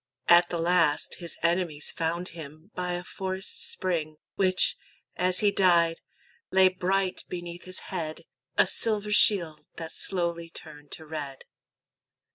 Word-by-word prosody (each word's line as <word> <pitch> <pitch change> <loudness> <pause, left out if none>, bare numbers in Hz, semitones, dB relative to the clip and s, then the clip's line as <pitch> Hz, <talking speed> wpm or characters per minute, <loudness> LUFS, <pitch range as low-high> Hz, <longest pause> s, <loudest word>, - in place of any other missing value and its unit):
At 175 0 +6
the 175 - -2
last 165 -3 +2
His 170 -2 -6
enemies 170 -3 0
found 170 +2 -2
him 155 +3 -11
by 180 -1 -3
a 175 0 -4
forest 190 +1 -1
spring, 160 -4 -2 0.2
Which, 185 -1 +3 0.4
as 180 0 +2
he 205 -1 +4
died, 170 -4 +3 0.5
lay 190 0 +5
bright 185 +1 -1
beneath 175 -1 -7
his 185 0 -3
head, 160 -4 -4 0.3
A - - +6
silver 210 -2 +1
shield 175 -7 +4
that 165 -1 -7
slowly 170 -2 -2
turned 150 -3 -9
to 160 - -8
red. 145 -4 -7
175 Hz, 135 wpm, -27 LUFS, 160-185 Hz, 0.5 s, At